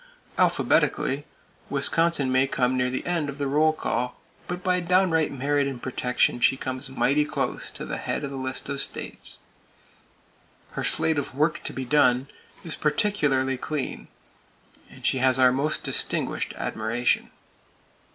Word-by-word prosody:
Alphabetically, - - +2 0.4
Wisconsin 165 -5 +2
may 130 +1 +3
come 130 -1 +1
near 125 0 +1
the 130 - -3
end 170 -4 0
of 140 - -6
the 145 - -1
roll 150 +3 +3
call; 125 -5 -2 0.3
but 180 0 -4
by 180 0 +2
downright 180 -2 +2
merit 140 +1 +1
in 135 -2 -4
protection, 125 0 0
she 135 - +4
comes 130 +1 -4
mighty 140 +2 +2
close 150 - -3
to - - -7
the - - -4
head - - -2
of 140 - -4
the - - -5
list 130 -1 -3
of 140 0 -3
states. - - -5 1.3
Her - - -4
slate 160 -2 +1
of 140 - -5
"Work 155 +3 +1
to - - -2
be 130 - -4
done" 125 -1 +3 0.3
is 165 - -4
particularly 145 - +1
clean; 150 +1 -4 0.8
and - - -12
she 130 - +2
has 130 0 +3
our 130 -1 +6
most 145 +4 -1
distinguished - - -1
admiration. 115 +3 0
140 Hz, 150 wpm, -25 LUFS, 130-155 Hz, 1.3 s, our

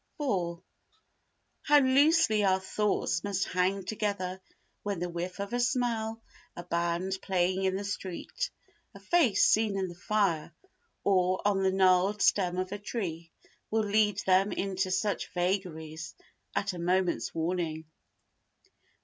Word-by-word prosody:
iv 180 - -1 1.0
How 295 0 +5
loosely 270 -4 +4
our 190 -1 +3
thoughts 190 -3 -1
must 200 -2 -1
hang 185 +2 0
together 200 -3 -3 0.4
when 205 -2 -3
the 175 +1 -3
whiff 175 +2 -5
of 200 +3 -4
a 245 - 0
smell, 235 -3 -1 0.3
a 175 - -7
band 175 +2 -1
playing 185 0 0
in 190 0 +1
the 200 - -3
street, 200 - -4 0.5
a - - -10
face 275 - +3
seen 215 -2 +3
in 190 -1 -1
the - - -8
fire, 180 -3 0 0.5
or 185 -1 +2
on 195 -2 +2
the 190 0 +2
gnarled 190 +2 +3
stem 180 -3 +2
of 185 0 -2
a 205 - -4
tree, 170 -7 -4 0.4
will 220 0 +1
lead 210 -1 +2
them 190 +2 +4
into 190 -1 -1
such 190 +2 -1
vagaries 165 -4 -2 0.4
at 200 -1 0
a 175 - -7
moment's 180 +1 0
warning. 165 -1 -2
190 Hz, 140 wpm, -29 LUFS, 180-210 Hz, 1.0 s, How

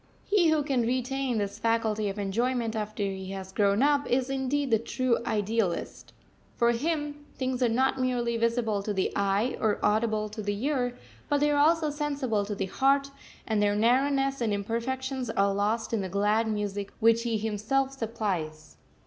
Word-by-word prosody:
He 380 -5 +3
who 310 -2 +2
can 270 -4 +1
retain 255 +1 -1
this 205 0 -3
faculty 220 -2 0
of 195 - -5
enjoyment 230 +3 -1
after 215 -1 -3
he 190 -1 -4
has 190 -1 -7
grown 200 +4 +2
up, 285 0 +2
is 260 +1 +1
indeed 270 0 -1
the 225 - +4
true 240 +1 0
Idealist. 210 -3 -1 0.4
For 235 0 +3
him 295 +2 -2
things 260 -1 -2
are 245 - +4
not 260 +3 +1
merely 240 -2 0
visible 230 -2 0
to 205 +1 -3
the 190 - 0
eye 200 +5 +1
or 215 -1 +1
audible 215 0 +1
to 215 +1 -6
the 205 +3 -2
ear, 250 -4 0 0.3
but 290 -1 +2
they 295 +1 +3
are 290 - +2
also 315 0 +3
sensible 285 -8 -1
to 205 0 -4
the - - -2
heart, 275 +7 +2 0.3
and 215 -2 0
their 205 0 +2
narrowness 270 +4 +2
and 225 -2 +1
imperfections 250 +5 -2
are 200 -2 +2
lost 215 +4 -1
in 220 - +1
the 190 - -4
glad 210 +4 +1
music 205 -2 -3
which 230 +1 +4
he 230 -2 -1
himself 220 +6 0
supplies. 185 -10 -4
230 Hz, 175 wpm, -28 LUFS, 210-265 Hz, 0.4 s, the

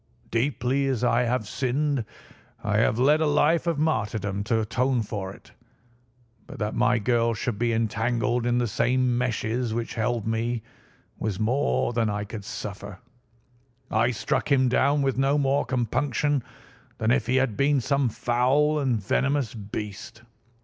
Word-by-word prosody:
Deeply 130 +2 0
as 130 -3 -1
I 120 0 +3
have 120 -3 -1
sinned, 135 +2 -1 0.6
I - - +1
have 110 - +2
led 145 +5 +4
a 155 - +3
life 150 +3 +2
of 165 -3 +1
martyrdom 105 -9 -1
to 115 +1 +1
atone 125 +2 0
for 100 -3 -5
it. - - -16 1.0
But - - -9
that 105 0 -2
my 125 +1 +2
girl 115 +1 +1
should 105 -1 -3
be 120 0 +1
entangled 115 +2 0
in 120 0 +2
the 120 - +1
same 125 +2 +1
meshes 120 -1 -1
which 115 0 -3
held 115 -1 -1
me 115 +1 -1 0.6
was 105 -3 -2
more 110 - +1
than 115 -2 +1
I 105 0 -2
could 105 -1 -8
suffer. 100 -2 -7 0.9
I 115 +3 +3
struck 125 +4 -1
him 130 -2 +4
down 140 +3 +2
with 135 -1 0
no 135 +2 +3
more 140 0 +1
compunction 130 +3 0 0.5
than 110 0 +1
if 120 -2 +1
he 125 - +1
had 130 -5 +1
been 140 +4 +2
some 140 0 +1
foul 130 +7 +2
and 130 -6 +1
venomous 135 +5 0
beast. 105 +2 -7
120 Hz, 155 wpm, -25 LUFS, 110-135 Hz, 1.0 s, led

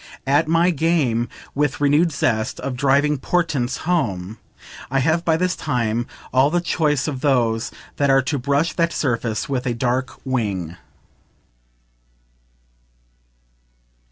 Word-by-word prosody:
At 145 +4 +2
my 165 +2 +3
game, 145 -8 +1 0.2
with 145 0 0
renewed 145 +4 +3
zest, 110 -7 -1
of 135 -2 -3
driving 140 +2 +2
portents 140 -6 0
home, 110 - -1 0.5
I 135 - 0
have 160 +5 +2
by 160 -2 +2
this 180 +1 0
time 120 -1 -1 0.3
all 130 +2 +4
the 175 +3 +1
choice 155 -5 0
of 135 -4 -4
those 120 -5 +1 0.3
that 140 -1 +2
are 135 -1 +4
to 140 +1 -1
brush 140 +5 +1
that 170 -1 0
surface 115 -5 -1
with 130 -2 -2
a 120 - -1
dark 125 +2 -1
wing. 100 -10 -2
135 Hz, 125 wpm, -21 LUFS, 120-160 Hz, 0.5 s, all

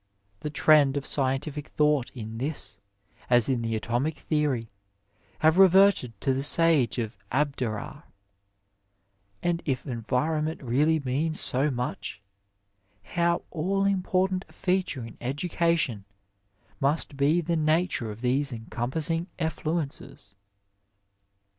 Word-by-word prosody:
The 150 - -4
trend 145 -2 +4
of 140 - -3
scientific 140 +2 -1
thought 150 -4 +1
in 110 -1 -6
this, 125 -7 -5 0.5
as 120 -2 +4
in 130 -3 0
the 115 -1 -1
atomic 120 +8 -1
theory, 145 -7 -1 0.7
has 160 +2 +3
reverted 190 - +5
to 135 - +2
the 135 - -1
Sage 145 -5 +3
of 115 -2 -3 0.2
Abdera; 130 -6 -2 1.4
and 175 -1 0
if 135 -3 -2
environment 150 +6 -1
really 150 +6 +2
means 145 +4 0
so 135 +4 +3
much, 125 -7 -4 0.8
how 170 +6 0
all 195 +4 0
important 190 -1 +1
a - - -19
feature 180 -9 -1
in 115 - -11
educa 170 +6 0
tion 110 -11 -2 0.7
must 145 +1 0
be 145 +5 +3
the 170 0 -1
nature 155 -6 +1
of 105 +2 -8
these 135 +3 +1
encompassing 135 +9 -2
effluences. 155 - -3
145 Hz, 115 wpm, -27 LUFS, 125-165 Hz, 1.4 s, reverted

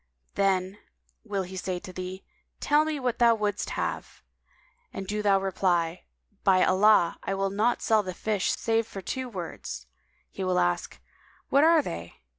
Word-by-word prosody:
Then 195 0 0 0.4
will 200 -4 -2
he 185 +1 -9
say 185 -1 -3
to 185 +1 -9
thee, 185 +1 -6 0.4
'Tell 300 +1 +3
me 310 -2 -2
what 250 -2 -2
thou 235 -1 +6
wouldst 210 -2 -2
have;' - - -4 0.7
and 195 - -6
do 210 +2 -2
thou 200 -2 +4
reply, 180 -3 0 0.4
"By 185 -2 +5
Allah, 190 -2 +4
I 195 - -2
will 195 0 -1
not 220 +5 +1
sell 220 -1 +4
the 185 -3 -6
fish 210 -2 -1
save 225 0 0
for 195 -4 -8
two 260 +6 -4
words!' 175 - -6 0.5
He 195 - -5
will 185 -1 +1
ask, 90 0 0 0.5
'What 280 +2 +4
are 325 -1 +5
they?' 85 - -6
195 Hz, 165 wpm, -27 LUFS, 185-225 Hz, 0.7 s, thou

